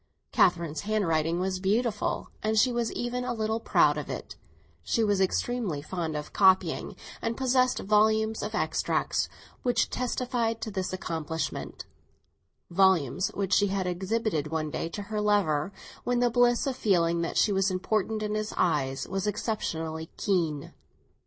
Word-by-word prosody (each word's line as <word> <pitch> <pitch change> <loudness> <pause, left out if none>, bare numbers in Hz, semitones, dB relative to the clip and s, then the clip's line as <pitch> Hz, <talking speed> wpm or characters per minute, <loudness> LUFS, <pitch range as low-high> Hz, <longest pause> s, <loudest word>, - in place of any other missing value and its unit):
Catherine's 170 -4 +2
handwriting 170 -6 0
was 185 0 -1
beautiful, 210 +3 0
and 220 +1 0
she 250 +4 +5
was 235 -2 -1
even 245 +1 -2
a 250 - -2
little 220 0 -1
proud 150 -8 +3
of 145 - -7
it; - - -6 0.5
she 230 - 0
was 205 -2 +2
extremely 195 -3 0
fond 165 -2 -3
of 150 0 -7
copying, 190 -1 +3 0.3
and 230 0 -2
possessed 255 -1 +2
volumes 220 +2 +2
of 210 +1 -4
extracts 160 -6 0 0.3
which 245 -1 +1
testified 245 -2 -1
to 220 - -4
this 190 -2 -2
accomplishment; 160 -3 -4 0.9
volumes 185 -2 +3
which 200 -1 -1
she 205 - +4
had 195 -1 -1
exhibited 185 -2 -1
one 155 -1 -2
day 165 - -3
to 205 +4 -5
her 210 +1 -3
lover, 195 -6 +2 0.3
when 245 0 +1
the 245 -1 +3
bliss 245 0 +3
of 270 -2 -1
feeling 170 -7 +2
that 170 - -2
she 210 - +4
was 195 0 +2
important 215 +3 -1
in 210 0 -2
his 215 0 -3
eyes 135 -6 0
was 195 +1 -2
exceptionally 160 -7 -3
keen. 165 -8 -1
200 Hz, 150 wpm, -28 LUFS, 170-220 Hz, 0.9 s, she